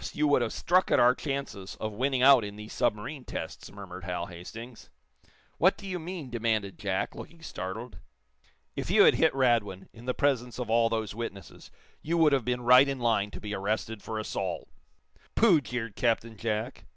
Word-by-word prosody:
You 150 - +1
would 145 - +4
have 120 - -1
struck 185 +2 +2
at - - +4
our 125 +1 +6
chances 135 -9 -5
of 110 -1 -3
winning 130 +3 0
out 135 -3 +8
in 100 0 -6
these 105 +1 -9
submarine 125 +7 -1
tests," - - -7
murmured 95 -2 -9
Hal 90 -1 -3
Hastings. 110 +8 -10 0.7
"What 185 +3 +4
do 200 - -11
you 185 -2 -3
mean?" 165 -5 -7
demanded 110 -4 -1
Jack, 100 -3 -1
looking 165 -1 -11
startled. 110 - -6 0.8
"If - - -4
you - - +6
had - - +7
hit - - +3
Radwin, 115 -8 +1
in 115 +1 -13
the 125 - -1
presence 125 -4 0
of 125 -3 -4
all 115 0 +4
those 110 -3 -2
witnesses, 105 -3 -8 0.3
you 170 +3 -1
would 155 -3 +5
have 135 -3 +2
been 125 0 -1
right 125 +3 +7
in 135 - -2
line 115 -4 +1
to - - -9
be 105 0 -5
arrested 105 +2 -2
for 110 - -5
assault." 110 - -3 0.7
"Pooh!" 190 -10 +5
jeered 115 -3 -5
Captain 115 -2 0
Jack. 110 +3 -3
115 Hz, 190 wpm, -28 LUFS, 105-135 Hz, 0.8 s, out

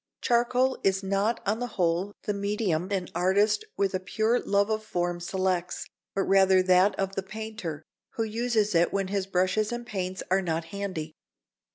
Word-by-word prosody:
Charcoal 250 +2 +2
is 195 0 +2
not 200 +4 0
on 210 +3 0
the 245 - -2
whole 180 +3 +1
the 210 - -1
medium 200 -4 -1
an 190 -3 -1
artist 200 - +2
with 200 -1 +1
a 185 - 0
pure 220 +5 +1
love 200 +1 +1
of 215 0 -1
form 175 -4 -2
selects, 185 0 -1 0.3
but 195 - +2
rather 190 -1 +5
that 185 +2 +4
of 195 0 -1
the 195 - -2
painter, 210 -6 -6 0.3
who 225 - 0
uses 220 -1 0
it 170 0 +3
when 195 -1 -1
his 195 -1 -1
brushes 185 +4 +1
and 240 0 -4
paints 185 -4 -4
are 190 +1 +4
not 165 -2 -2
handy. 185 -6 -4
195 Hz, 175 wpm, -27 LUFS, 185-215 Hz, 0.3 s, rather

